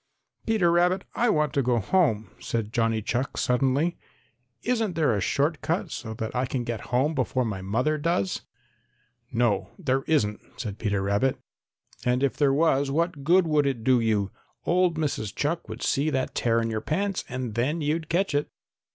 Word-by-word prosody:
"Peter 210 -7 +3
Rabbit, 180 +2 +3
I 240 0 +2
want 150 -7 +2
to 140 - +2
go 125 -2 +2
home," 110 - +1
said 115 -1 -3
Johnny 115 -2 +1
Chuck 125 +5 -2
suddenly. 135 +7 +1 0.6
"Isn't 225 -7 0
there 150 -8 +2
a 100 - -1
short 145 - 0
cut 165 +4 -1
so 110 -2 -5
that 110 +2 -4
I 125 +1 +1
can 125 -1 -2
get 115 -3 -4
home 130 +6 +2
before 130 -2 0
my 100 -4 -3
mother 125 +11 0
does?" 145 - 0 0.9
"No, 105 -6 +1
there 130 +1 0
isn't," 105 -10 +1 0.2
said 105 -4 -5
Peter 100 -3 0
Rabbit. 100 +7 +1 0.7
"And 125 +2 +1
if 140 - +1
there 145 -2 +3
was 140 -2 +2
what 160 0 -1
good 175 +4 +5
would 150 -3 +2
it 125 -5 -2
do 130 0 +4
you? 105 -4 +1 0.3
Old 175 -2 +2
Mrs. 130 -10 -2
Chuck 160 +4 -2
would - - -6
see 145 +1 +1
that 130 -3 -1
tear 115 -1 +2
in 115 0 -1
your 110 -1 -2
pants 195 +5 -1
and 125 -3 -4
then 140 +9 0
you'd 155 +2 -1
catch 180 0 +1
it!" 145 +1 0
135 Hz, 180 wpm, -26 LUFS, 115-160 Hz, 0.9 s, good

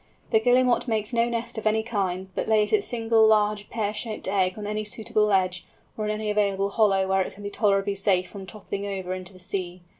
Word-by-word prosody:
The 220 - +5
Guillemot 250 +2 +3
makes 220 0 -1
no 235 0 +2
nest 235 -1 -3
of 220 - -2
any 220 +1 +2
kind, 190 -4 -2
but - - -3
lays 215 -1 +2
its 420 -1 +3
single 225 -2 +3
large 210 -1 +2
pear 210 -2 -2
shaped 215 -1 -5
egg 190 -1 +1
on 210 - -6
any 210 +1 -2
suitable 215 0 0
ledge, 185 -3 +1 0.3
or 215 - -3
in 210 - 0
any 215 0 -2
available 200 -1 +1
hollow 195 -3 +3
where 190 0 +2
it - - -4
can 205 - -12
be 205 - -5
tolerably 200 -1 +1
safe 190 -2 +1
from 195 -1 -10
toppling 200 -1 -6
over 190 -2 -4
into 185 0 -7
the - - -14
sea. 180 -1 -4
210 Hz, 220 wpm, -25 LUFS, 195-220 Hz, 0.3 s, The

